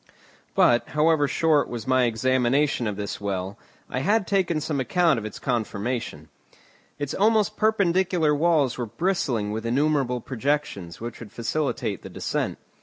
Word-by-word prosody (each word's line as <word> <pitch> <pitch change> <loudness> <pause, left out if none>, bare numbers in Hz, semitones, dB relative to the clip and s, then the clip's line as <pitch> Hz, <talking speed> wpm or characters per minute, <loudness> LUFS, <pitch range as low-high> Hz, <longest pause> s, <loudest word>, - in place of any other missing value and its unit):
But, 120 0 +4
however 155 -1 +4
short 155 0 +2
was 115 -2 -5
my 130 -1 +3
examination 130 +2 +1
of 105 - -2
this 100 0 -5
well, 100 +1 -3 0.3
I 130 - -3
had 205 +8 +2
taken 180 -5 +1
some 150 -1 -2
account 155 +2 +2
of 110 - -7
its 110 - -6
conformation. 120 -1 -3 0.7
Its 145 -1 -3
almost 215 0 +2
perpendicular 185 -7 +2
walls 150 -5 +2
were 120 - -2
bristling 125 - -1
with 110 +1 -3
innumerable 130 0 +1
projections 130 -9 -2
which 120 +1 -7
would 115 -3 -10
facilitate 140 +6 -2
the - - -9
descent. - - -2
135 Hz, 145 wpm, -25 LUFS, 115-160 Hz, 0.7 s, But